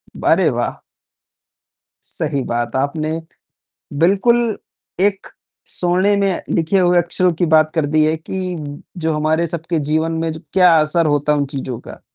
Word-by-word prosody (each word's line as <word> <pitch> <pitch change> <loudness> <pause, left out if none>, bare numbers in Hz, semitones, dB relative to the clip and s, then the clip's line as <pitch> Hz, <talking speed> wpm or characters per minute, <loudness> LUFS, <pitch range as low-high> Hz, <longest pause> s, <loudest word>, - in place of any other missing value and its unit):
ब - - -8
अरे - - +4
वाह! - - -2 1.4
सही 140 - -2
बात, 120 0 -2
आपने 155 +4 -1 0.8
बिल्कुल, 225 +5 +2 0.4
एक 195 0 +1 0.5
सोने 185 +3 +2
में 195 -2 0
लिखे 165 +4 +1
हुए 175 -1 +3
अक्षरों 175 +1 +2
की 170 +1 -1
बात 155 0 +4
कर 160 -3 +1
दी 155 +1 +2
है 155 +1 +1
कि 180 +2 -5 0.5
जो 160 - +2
हमारे 155 +2 +1
सबके 165 0 -3
जीवन 160 +1 +1
में 165 - -1
ज 160 - -8
क्या 180 -3 +5
असर 155 +2 +2
होता 145 0 +1
है 150 - +1
उन 140 - 0
चीज़ों 130 -3 -5
का। - - -11
165 Hz, 160 wpm, -18 LUFS, 155-180 Hz, 1.4 s, क्या